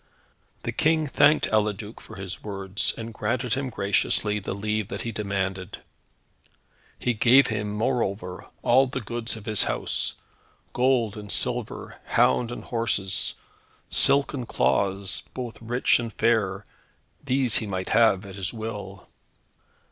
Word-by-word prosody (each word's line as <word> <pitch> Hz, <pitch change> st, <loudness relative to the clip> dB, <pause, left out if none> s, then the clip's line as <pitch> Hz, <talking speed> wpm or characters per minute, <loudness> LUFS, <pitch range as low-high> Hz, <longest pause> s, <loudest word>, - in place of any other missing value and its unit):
The -, -, -2 dB
King 155 Hz, 0 st, +2 dB
thanked 145 Hz, +2 st, +4 dB
Eliduc 105 Hz, 0 st, 0 dB
for -, -, -11 dB
his 95 Hz, -2 st, -6 dB
words, 100 Hz, -1 st, -1 dB
and 115 Hz, 0 st, -6 dB
granted 120 Hz, +2 st, -1 dB
him 135 Hz, 0 st, -1 dB
graciously 105 Hz, 0 st, +1 dB
the 95 Hz, -1 st, -4 dB
leave 105 Hz, 0 st, -1 dB
that -, -, -5 dB
he 115 Hz, -, -3 dB
demanded. 95 Hz, -3 st, -3 dB, 1.2 s
He 125 Hz, -, 0 dB
gave 125 Hz, +5 st, +6 dB
him, 105 Hz, -2 st, -2 dB
moreover, 105 Hz, -5 st, -2 dB, 0.2 s
all 130 Hz, +3 st, +5 dB
the 130 Hz, -, -3 dB
goods 120 Hz, +1 st, -4 dB
of 110 Hz, -2 st, -10 dB
his 110 Hz, -2 st, +2 dB
house; -, -, -1 dB, 0.6 s
gold 125 Hz, -4 st, +2 dB
and 105 Hz, -1 st, -7 dB
silver, 125 Hz, -2 st, -2 dB
hound 120 Hz, -1 st, +2 dB
and -, -, -6 dB
horses, 105 Hz, -5 st, -1 dB, 0.6 s
silken 140 Hz, -3 st, +2 dB
cloths, 100 Hz, -2 st, +2 dB
both 120 Hz, -3 st, -6 dB
rich 120 Hz, +2 st, +2 dB
and 115 Hz, -1 st, -4 dB
fair, 105 Hz, -5 st, +1 dB, 0.6 s
these 130 Hz, -3 st, +3 dB
he 110 Hz, -, -2 dB
might 95 Hz, -2 st, -3 dB
have 110 Hz, -4 st, +4 dB
at 95 Hz, -1 st, -9 dB
his 95 Hz, 0 st, -2 dB
will. 105 Hz, -4 st, -7 dB
110 Hz, 135 wpm, -25 LUFS, 100-120 Hz, 1.2 s, gave